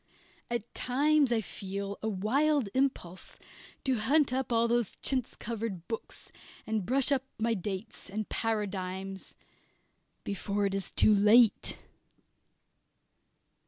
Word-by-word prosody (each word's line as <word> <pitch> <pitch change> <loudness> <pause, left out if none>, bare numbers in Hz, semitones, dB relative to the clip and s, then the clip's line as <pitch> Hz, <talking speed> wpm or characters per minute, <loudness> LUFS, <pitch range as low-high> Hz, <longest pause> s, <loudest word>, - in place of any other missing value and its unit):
At 235 -1 -3
times 285 +1 +2
I 230 -2 +2
feel 200 0 -5
a 220 - -1
wild 255 +6 +1
impulse 255 -10 -2 0.5
to 260 -4 +1
hunt 275 +4 +3
up 260 -1 -1
all 230 0 +3
those 235 -3 0
chintz 255 -3 0
covered 220 -6 -5
books, 225 -1 -6 0.3
and 215 -4 -2
brush 270 +3 +2
up 275 -2 +3 0.2
my 230 +1 +1
dates 195 0 -5
and 215 +2 -3
paradigms, 195 -3 -3 0.9
before 200 +1 -1
it 195 - 0
is 195 -2 -2
too 215 - +4
late. 210 +3 +5
220 Hz, 120 wpm, -30 LUFS, 200-250 Hz, 0.9 s, late